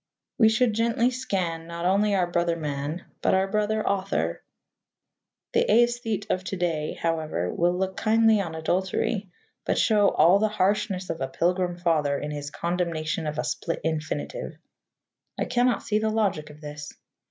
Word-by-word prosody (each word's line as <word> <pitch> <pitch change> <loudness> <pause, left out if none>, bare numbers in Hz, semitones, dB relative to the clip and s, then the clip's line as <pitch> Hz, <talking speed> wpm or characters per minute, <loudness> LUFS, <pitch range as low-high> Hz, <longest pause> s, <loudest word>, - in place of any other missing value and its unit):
We 220 -2 +7
should 220 +1 +2
gently 230 +2 +2
scan, 185 -10 -2
not 170 0 -5
only 200 +2 +3
our 185 -2 +2
brother 170 -1 0
man, 150 +1 -4 0.2
but - - +3
our 190 +1 +2
brother 215 +2 0
author. 190 - -1 1.1
The - - +4
æsthete 230 -2 +2
of 185 - 0
to 195 - -3
day, 165 -4 -2
however, 155 - -1
will 175 +1 +1
look 190 0 -2
kindly 220 -1 +4
on 165 -4 -5
adultery, 190 +4 -1 0.3
but - - 0
show 210 -3 +4
all 175 +6 +5
the 215 - +3
harshness 195 -2 0
of 165 - -6
a 135 - 0
Pilgrim 175 +4 0
Father 155 -5 +1
in 150 +1 -4
his 145 -1 -5
condemnation 170 -2 -2
of 150 0 -3
a - - 0
split 165 - -3
infinitive. 160 - -3 0.8
I - - 0
cannot 245 0 +1
see 210 0 +1
the 220 0 0
logic 205 -8 0
of 150 0 -14
this. 150 0 -7
180 Hz, 165 wpm, -26 LUFS, 160-210 Hz, 1.1 s, We